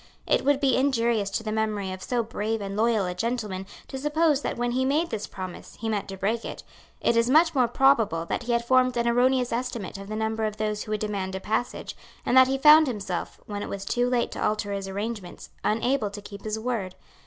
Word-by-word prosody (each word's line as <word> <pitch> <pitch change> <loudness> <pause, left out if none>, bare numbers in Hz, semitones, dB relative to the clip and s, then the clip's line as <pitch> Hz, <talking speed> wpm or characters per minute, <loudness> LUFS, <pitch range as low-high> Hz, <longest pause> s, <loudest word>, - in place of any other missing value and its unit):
It - - +2
would 285 0 +3
be 275 -3 +3
injurious 235 -6 +1
to 220 - -2
the 215 - -3
memory 215 -3 -1
of 185 0 -7
so 245 -2 0
brave 220 0 -2
and 200 -1 -5
loyal 220 -2 +2
a 180 - -2
gentleman 205 -2 -3 0.2
to 265 - -6
suppose 300 0 +2
that - - -3
when 240 0 0
he 255 +2 +1
made 300 +6 +1
this 210 -2 -3
promise 185 -2 -8
he 225 - -2
meant 205 -2 -1
to 195 - -7
break 220 +5 -1
it. - - -7 0.4
It - - +2
is 230 +1 +3
much 320 +4 +5
more 255 -4 +3
probable 230 -10 +3
that - - -2
he 240 0 -1
had 235 0 +1
formed 255 0 +3
an 235 0 +1
erroneous 250 +1 +2
estimate 230 -5 -3
of 195 - -9
the 215 - -4
number 220 0 -1
of 215 0 -3
those 215 -1 -1
who 215 - -6
would 215 - -1
demand 195 -3 -2
a - - -3
passage, 220 +5 -3 0.3
and - - +1
that 260 0 +8
he 270 +1 0
found 300 +2 +8
himself, 200 -7 -4
when 205 -1 -5
it - - -5
was 195 0 -5
too 245 +4 +1
late 245 -1 +1
to - - -4
alter 210 -1 0
his 195 -1 -4
arrangements, 200 -1 -5
unable 230 +1 +1
to 200 +1 -8
keep 200 0 -10
his 215 0 -2
word. 220 -5 -3
225 Hz, 235 wpm, -26 LUFS, 205-250 Hz, 0.4 s, that